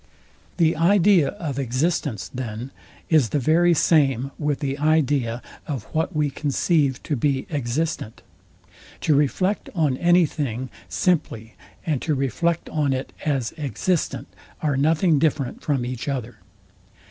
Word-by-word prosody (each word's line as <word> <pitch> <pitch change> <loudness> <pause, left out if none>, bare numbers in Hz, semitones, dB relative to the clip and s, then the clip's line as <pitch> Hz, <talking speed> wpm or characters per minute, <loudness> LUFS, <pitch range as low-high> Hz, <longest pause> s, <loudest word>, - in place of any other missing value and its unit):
The 165 -2 +3
idea 175 -1 +4
of 145 -5 -4
existence, 130 - -1
then, 125 0 -5 0.4
is 150 -8 +4
the - - 0
very 165 +5 +3
same 140 -5 +2
with 145 -2 -1
the 140 -1 -3
idea 145 -6 +1 0.2
of 135 -8 -3
what 160 +2 -1
we 150 -2 +1
conceive 145 -1 0
to 150 - -1
be 135 +1 0
existent. 140 - -2 0.8
To 155 - +2
reflect 165 +8 +1
on 150 -7 +1
any 175 +2 +4
thing 130 -4 -4 0.2
simply, 115 - -1 0.3
and 150 -6 0
to 155 - 0
reflect 155 +6 -1
on 145 -3 +1
it 130 +1 -4
as 135 -6 0
existent, 155 +4 -1 0.4
are 145 -3 +1
nothing 155 +3 +3
different 140 -4 0
from 135 -5 -1
each 125 +1 -5
other. 125 -5 -3
145 Hz, 135 wpm, -23 LUFS, 130-160 Hz, 0.8 s, idea